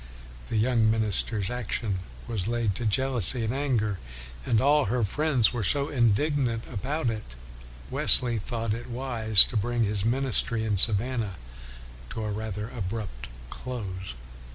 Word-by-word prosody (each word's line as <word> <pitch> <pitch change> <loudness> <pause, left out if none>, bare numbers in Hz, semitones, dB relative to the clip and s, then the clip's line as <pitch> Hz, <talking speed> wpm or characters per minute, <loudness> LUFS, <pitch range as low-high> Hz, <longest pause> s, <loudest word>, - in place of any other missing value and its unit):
The 115 - -2
young 115 0 +3
minister's 110 -1 +1
action 115 -4 -2 0.3
was 105 -5 -3
laid 115 -3 0
to 115 +4 -2
jealousy 125 0 +2
and 110 +2 -1
anger. 120 -8 0 0.5
And 115 - +3
all 145 +1 +4
her 120 +4 0
friends 135 +2 +2
were 120 -3 -2
so 140 +8 +1
indignant 120 0 +1
about 125 +3 -2
it 110 - -7
that - - -11 0.6
Wesley 120 -3 +1
thought 115 0 -3
it 120 +3 -6
wise 115 -5 +4
to - - -9
bring 120 +2 0
his 105 -2 -1
min 125 +5 +1
istry 115 -2 +4
in 105 -2 0
Savannah 110 0 0 0.7
to 110 - -5
a 105 - -2
rather 105 0 -4
abrupt 100 - -5 0.2
close. 95 - -6
115 Hz, 150 wpm, -27 LUFS, 105-125 Hz, 0.7 s, all